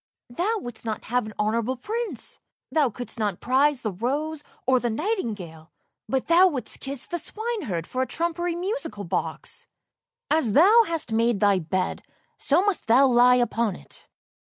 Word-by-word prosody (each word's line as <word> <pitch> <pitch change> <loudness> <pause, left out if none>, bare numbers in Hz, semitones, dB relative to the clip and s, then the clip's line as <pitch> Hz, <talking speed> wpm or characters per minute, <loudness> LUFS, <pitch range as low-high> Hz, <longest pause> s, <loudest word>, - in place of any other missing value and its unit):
" - - -68
Thou 425 - +1
wouldst 245 - -8
not 220 -2 -4
have 245 -1 0
an 215 - -8
honourable 230 +4 0
prince, 425 - -4 0.3
thou 295 -2 +3
couldst 240 +1 -8
not 205 -4 -1
prize 270 +2 +2
the 215 - -2
rose 290 - -2 0.2
or 260 0 +4
the 240 - -1
nightingale, 215 - -3 0.4
but 265 -1 0
thou 345 +3 +6
wouldst 285 -8 -4
kiss 275 -2 -6
the 345 - -4
swineherd 405 - -4
for 255 - -3
a 260 - 0
trumpery 340 +5 -1
musical 355 - -4
box! 170 - -3 0.6
As 285 -9 +2
thou 420 - +7
hast 330 -7 -3
made 230 -1 +2
thy 200 -2 +4
bed, 185 +3 -2 0.4
so 340 +7 +3
must 405 - -1
thou 250 +5 +6
lie 250 -1 +6
upon 235 -4 +1
it! - - -11
255 Hz, 165 wpm, -25 LUFS, 220-335 Hz, 0.6 s, thou